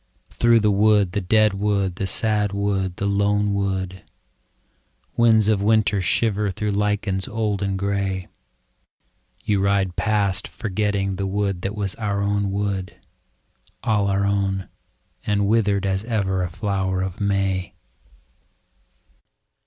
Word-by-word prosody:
Through 115 -1 +3
the 105 0 +3
wood, 105 -2 +3
the 100 +2 -1
dead 110 +2 +3
wood, 100 -2 -1
the 95 - -2
sad 105 0 +1
wood, 100 -2 -1
the 100 - -2
lone 100 +1 +1
wood, 95 -2 -2 1.1
Winds 110 -3 +4
of 105 -2 +2
winter 105 -1 +2
shiver 105 +2 +1
through 105 +3 -2
lichens 100 -2 -1
old 105 -2 -2
and 100 -1 -1
grey. 100 -1 -2 1.2
You 105 -2 +1
ride 100 -2 +1
past 100 -3 0
forgetting 100 -2 -2
the 100 0 -2
wood 100 -2 -1
that 100 +3 -3
was 100 -3 -2
our 100 -3 -2
own 100 0 0
wood. 100 -1 -3 0.9
All 105 -3 +1
our 100 0 +1
own 100 -1 -1 0.2
— - - -30
and 100 -1 +1
withered 105 -2 +2
as 95 0 -1
ever 100 -5 0
a 90 - -2
flower 95 0 -1
of 95 +2 -5
May. 95 -2 -1
100 Hz, 135 wpm, -22 LUFS, 95-105 Hz, 1.2 s, Winds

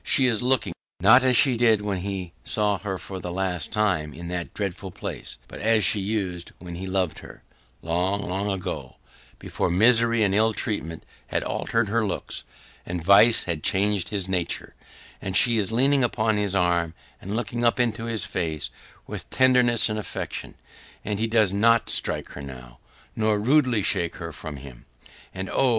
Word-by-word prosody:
She 135 - +4
is 115 -4 +2
looking 125 0 +1 0.3
not 110 +8 +6
as 130 -2 +4
she 130 -3 +5
did 115 -3 +3
when 100 -2 -2
he 95 -2 -5
saw 105 -2 +1
her 95 -3 -4
for 95 +1 -8
the 90 - -6
last 90 -2 -2
time 90 -9 +1
in 85 +1 -8
that 90 -1 -4
dreadful 100 -1 -4
place, - - -6
but - - -10
as 110 0 +2
she 100 +3 +5
used 95 -4 -3
when 90 -1 -9
he 90 +2 -6
loved 95 -4 -1
her - - -13 0.4
long, 90 +5 -1
long 95 +3 -2
ago, 95 -2 -5 0.4
before - - -3
misery 115 +4 +4
and 100 -2 +1
ill 110 +2 +3
treatment 85 -8 -3 0.2
had - - -1
altered 115 -1 -1
her 115 +2 +1
looks, 100 - -3 0.4
and 85 -1 -5
vice 105 +4 +6
had 85 -3 -3
changed 100 +1 0
his 100 -3 -3
nature, 90 -3 -2 0.5
and 95 -1 0
she 120 -2 +4
is 100 0 0
leaning 135 +3 +3
upon 110 -2 +1
his 100 -2 -1
arm, 85 -2 +1 0.3
and 100 +3 -5
looking 120 +1 -3
up 120 +1 +3
into 115 -2 0
his 115 -4 -3
face 80 -4 -3 0.3
with - - -6
tenderness 125 -3 +3
and 110 0 -3
affection 105 - -6 0.5
and 105 0 -2
he 115 - 0
does 110 -4 +2
NOT 115 +3 +3
strike - - 0
her - - -9
now, 65 -3 -11 0.4
nor 110 -1 +1
rudely 125 -1 +2
shake 85 -2 +1
her 85 -1 -7
from 80 0 -8
him. 65 -3 -12 0.5
And 95 0 -5
oh! 135 +6 +2
100 Hz, 180 wpm, -24 LUFS, 90-115 Hz, 0.5 s, not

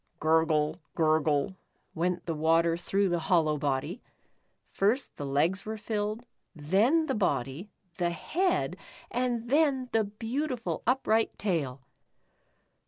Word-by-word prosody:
"Gurgle, 160 0 +2
gurgle" 155 +2 +2 0.4
went 175 +2 -1
the 165 - -1
water 165 +2 +3
through 195 +3 0
the 175 -1 +1
hollow 160 -3 +2
body. 145 - -2 0.7
First 225 +7 +1
the 145 - -4
legs 155 +7 +1
were 220 0 -5
filled, 215 +2 -3 0.3
then 205 - +2
the - - -1
body, 145 - -1 0.3
the 175 -2 +1
head, 345 - 0 0.3
and 245 -1 -1
then 280 -4 +2
the 225 -1 +3
beautiful 230 +5 -3
upright 225 -3 +2
tail. 150 -10 -1
185 Hz, 115 wpm, -29 LUFS, 155-225 Hz, 0.7 s, water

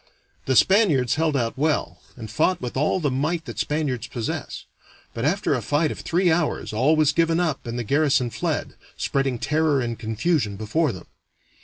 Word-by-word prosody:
The 130 - +2
Spaniards 160 - +4
held 155 -1 +1
out 120 0 -2
well, 155 0 -1 0.2
and 115 -3 -7
fought 160 +8 +1
with 125 -1 -5
all 150 +7 +1
the 145 -5 0
might 155 +5 -1
that - - -7
Spaniards 140 -5 -1
possess; 115 -3 -5 0.5
but 115 +2 -3
after 180 +1 +1
a 130 - -1
fight 145 +7 +1
of - - -7
three 175 +1 +1
hours 160 -8 -1
all 130 +9 +3
was 155 -1 +3
given 165 +2 +2
up 155 -8 -1
and 120 +1 -4
the 120 - -2
garrison 135 -1 +2
fled, - - -2 0.2
spreading 135 -2 -1
terror 150 +2 +1
and 120 -2 -3
confusion 110 - -1
before 120 +9 0
them. 95 - -10
145 Hz, 180 wpm, -23 LUFS, 120-160 Hz, 0.5 s, Spaniards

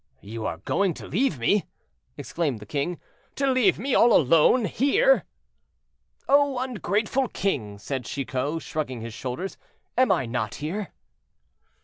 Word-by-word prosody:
"You 110 +2 -5
are 80 - -4
going 180 - 0
to - - -9
leave 215 - 0
me!" 180 - +1 0.5
exclaimed 145 -2 -2
the 105 - -10
king; 150 +7 -2 0.4
"to 275 - 0
leave 255 -4 +3
me 265 +4 -2
all 235 0 +6
alone 165 - +5
here?"—"Oh! 285 - 0
ungrateful 245 - -1
king," 120 - -2
said 130 +4 -4
Chicot, 140 +4 -3
shrugging 135 -7 -4
his 115 0 -7
shoulders, 130 - -5 0.4
"am 255 -4 +4
I 165 -9 +2
not 115 -2 -3
here?" 185 +8 -4
165 Hz, 130 wpm, -25 LUFS, -, 0.5 s, all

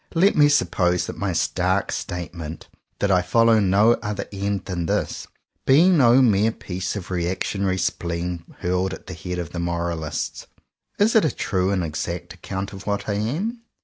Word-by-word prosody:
Let 190 +5 +4
me 145 -1 +6
suppose 90 -11 +2
that - - -6
my 100 -2 -2
stark 90 +2 0
statement 85 -2 -5 0.2
— - - -50
that 100 - +2
I 90 -1 +4
follow 115 +4 +4
no 100 +3 +4
other 105 -2 -3
end 100 -1 -2
than 85 -3 -3
this - - -2 0.2
— - - -51
be 155 +7 +6
no 135 -7 +6
mere 110 -1 +3
piece 90 -3 -5
of 95 -2 -6
reactionary 95 +2 -1
spleen 85 -1 -2 0.2
hurled 90 +1 0
at - - -15
the 95 - -7
head 90 +1 -5
of 85 -3 -5
Moralists. 85 -3 -3 0.5
Is 210 +3 +3
it 220 - +6
a 155 - +3
true 95 -6 -1
and 95 -3 0
exact 85 +2 -4
account 95 +3 -5
of 95 +1 -10
what 100 0 -1
I 105 - 0
am 160 - -2
95 Hz, 180 wpm, -23 LUFS, 90-110 Hz, 0.5 s, me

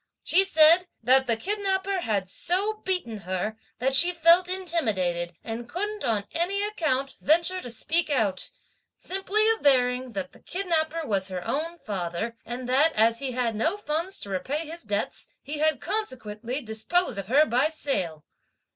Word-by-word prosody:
She 380 +3 +4
said, 335 0 +6 0.2
'that 260 +2 +4
the 230 -2 +2
kidnapper 390 - -1
had 205 - -1
so 405 - -1
beaten 355 - -2
her, 185 +3 -3 0.2
that 265 +2 0
she 345 +7 +5
felt 340 +2 +5
intimidated, 210 - 0
and 230 +1 -6
couldn't 415 +4 -3
on 210 -3 0
any 380 +5 0
account, 305 -10 -1
venture 340 +5 +2
to 245 - -6
speak 315 +10 0
out; 215 -10 0 0.5
simply 390 +3 0
averring 255 - +2
that 190 -2 -4
the - - -18
kidnapper 330 -3 -1
was 195 -5 0
her 185 -2 -5
own 330 +4 -2
father, 200 - -4
and 245 +2 -5
that, 280 +6 +3
as 225 +1 +3
he 265 -2 -3
had 240 -3 -1
no 320 - 0
funds 340 +1 -1
to 200 - -6
repay 285 - -2
his 330 +2 -8
debts, 205 -1 -3 0.2
he 295 +2 -5
had 310 +1 +2
consequently 255 - -4
disposed 225 - -1
of 195 - -6
her 285 +7 +5
by 255 +2 +2
sale!' 185 - -3
275 Hz, 160 wpm, -26 LUFS, 220-345 Hz, 0.5 s, said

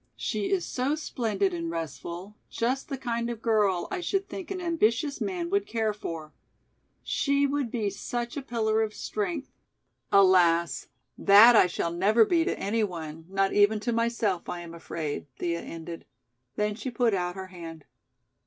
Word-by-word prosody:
She 210 -3 -2
is 380 -3 +1
so 265 +4 -1
splendid 215 - -1
and 170 -1 -3
restful, 170 +4 -6
just 255 +5 -1
the 275 - -3
kind 235 -2 -2
of 235 -2 -4
girl 210 -6 +2
I 375 -2 -2
should 390 +2 -1
think 375 -3 -7
an 385 -1 -3
ambitious 295 -5 +1
man 355 -2 -2
would 400 0 +1
care 220 - 0
for. 165 -6 -7 0.7
She 280 0 +1
would 280 -3 -1
be 215 -4 -1
such 235 +4 -4
a 285 - -3
pillar 225 -3 0
of 215 -1 -2
strength. 270 +7 -3 0.6
Alas, 170 -6 +4 0.3
that 210 +4 +8
I 185 - +7
shall 170 -1 -2
never 210 +6 +4
be 335 +3 +3
to - - -1
any 220 +3 0
one, 165 -4 -5
not 195 0 +1
even 205 +1 +4
to 240 +2 -1
myself 230 -5 0
I 175 - -4
am 170 -1 -9
afraid!" 160 -3 -5
Thea 170 -1 -2
ended. 165 0 -8 0.5
Then 210 0 0
she 250 +5 -5
put 235 -2 +1
out 180 -1 -1
her 190 -1 -6
hand. 165 -3 -9
215 Hz, 170 wpm, -27 LUFS, 175-250 Hz, 0.7 s, that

